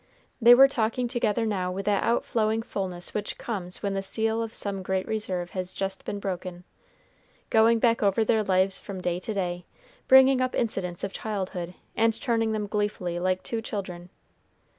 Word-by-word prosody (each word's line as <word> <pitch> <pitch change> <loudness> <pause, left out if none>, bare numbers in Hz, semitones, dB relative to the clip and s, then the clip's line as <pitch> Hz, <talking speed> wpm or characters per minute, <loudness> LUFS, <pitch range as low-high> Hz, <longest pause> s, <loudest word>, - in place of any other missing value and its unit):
They 240 +2 +9
were 270 +2 +8
talking 240 -1 -1
together 230 -2 0
now 185 -4 -1
with 195 +1 -4
that 205 -1 +2
outflowing 225 -1 0
fullness 185 -5 -5
which 210 -1 -3
comes 185 -6 -4
when 200 -1 -1
the 195 - -1
seal 220 +3 -1
of 225 -1 -4
some 200 -3 -4
great 190 0 -2
reserve 185 -5 -2
has 185 -1 -4
just 195 0 -4
been 205 - -3
broken, 180 -2 -5 0.9
going 225 +1 +5
back 230 0 +2
over 205 +2 +2
their 220 0 +2
lives 190 -1 +1
from 195 -2 -7
day 175 -1 -1
to 215 +4 -4
day, 180 -2 -2 0.4
bringing 265 0 +7
up 255 0 -1
incidents 180 -6 -2
of 195 - -3
childhood, 185 -4 -4 0.2
and 225 0 +2
turning 225 -3 0
them 215 -1 -1
gleefully 205 -4 -2
like 185 +1 0
two 230 -1 -3
children. 185 -5 -6
205 Hz, 175 wpm, -26 LUFS, 185-225 Hz, 0.9 s, They